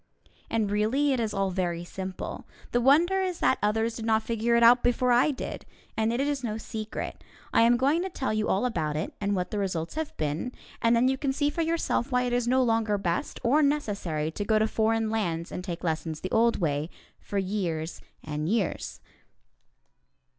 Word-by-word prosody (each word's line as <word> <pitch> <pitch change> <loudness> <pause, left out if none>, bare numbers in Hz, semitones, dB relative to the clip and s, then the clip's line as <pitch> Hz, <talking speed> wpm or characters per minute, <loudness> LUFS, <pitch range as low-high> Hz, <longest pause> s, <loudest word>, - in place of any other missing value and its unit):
And, 215 -3 0
really, 250 +8 +2
it 255 - 0
is 220 -2 -1
all 195 -1 0
very 175 -2 -2
simple. 185 +1 -6 0.2
The 240 - +2
wonder 335 +9 +4
is 365 -2 -1
that - - +2
others 225 +2 0
did 225 - -5
not 220 -1 +3
figure 230 +1 +1
it 235 - +4
out 245 +2 +7
before 245 +1 +2
I 245 +5 +5
did. 275 - -5 0.3
And 220 0 +1
it 235 - -1
is 280 -1 -1
no 220 -2 -2
secret. 220 -1 -6 0.3
I - - +5
am 235 +1 +5
going 280 +7 +2
to 380 - -2
tell 265 -9 -2
you 215 0 0
all 200 +6 +2
about 160 -11 -1
it, 155 - -3
and 200 0 0
what 180 -1 -2
the 210 - -1
results 175 -5 -2
have 315 -1 -4
been, 155 - -2 0.3
and 230 0 +4
then 240 +2 +4
you 265 0 0
can 275 -2 0
see 290 +2 0
for 335 - -2
yourself 325 -5 0
why 250 0 +2
it 245 -1 -1
is 245 -1 +1
no 260 +1 +4
longer 225 -3 +1
best 175 -4 -2
or 270 +6 +4
necessary 200 - 0
to 205 - -4
go 215 +1 +2
to 215 - +3
foreign 220 0 +1
lands 170 -7 -2
and 180 - -5
take 175 -2 -5
lessons 160 -1 -2
the 185 - -4
old 230 +1 +3
way, 150 -2 -1 0.3
for 200 - -5
years 180 -5 -2 0.2
and 155 +1 -3
years. 215 -3 -1
220 Hz, 205 wpm, -27 LUFS, 185-250 Hz, 0.3 s, out